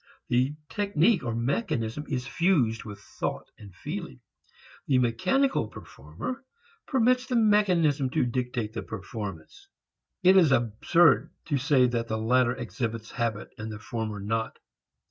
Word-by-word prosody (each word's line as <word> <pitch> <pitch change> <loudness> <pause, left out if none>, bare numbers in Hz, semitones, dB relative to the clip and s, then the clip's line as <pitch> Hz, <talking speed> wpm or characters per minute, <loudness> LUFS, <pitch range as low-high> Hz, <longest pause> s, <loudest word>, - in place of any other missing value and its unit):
The 130 +4 +2
technique 200 -1 +2
or 115 -2 -2
mechanism 120 - -1
is 130 -4 -2
fused 130 -9 +1
with 105 -2 -8
thought 105 - -5
and 100 -2 -12
feeling. 65 - -6 0.7
The 135 - +3
"mechanical" 125 - +1
performer 100 - -8 0.4
permits 255 0 +2
the 255 - -1
mechanism 180 - +3
to 125 - +1
dictate 120 -3 -2
the - - -4
performance. 105 - -7 0.6
It 185 +1 +7
is 165 -6 +5
absurd 125 +8 +3 0.2
to 145 -4 0
say 130 -1 +4
that 120 -2 -1
the 110 -1 -2
latter 120 +2 +2
exhibits 115 -1 -4
habit 115 -4 -2
and 110 +1 -5
the 110 - -6
former 110 -2 -4
not. 110 +3 -2
125 Hz, 135 wpm, -27 LUFS, 110-165 Hz, 0.7 s, It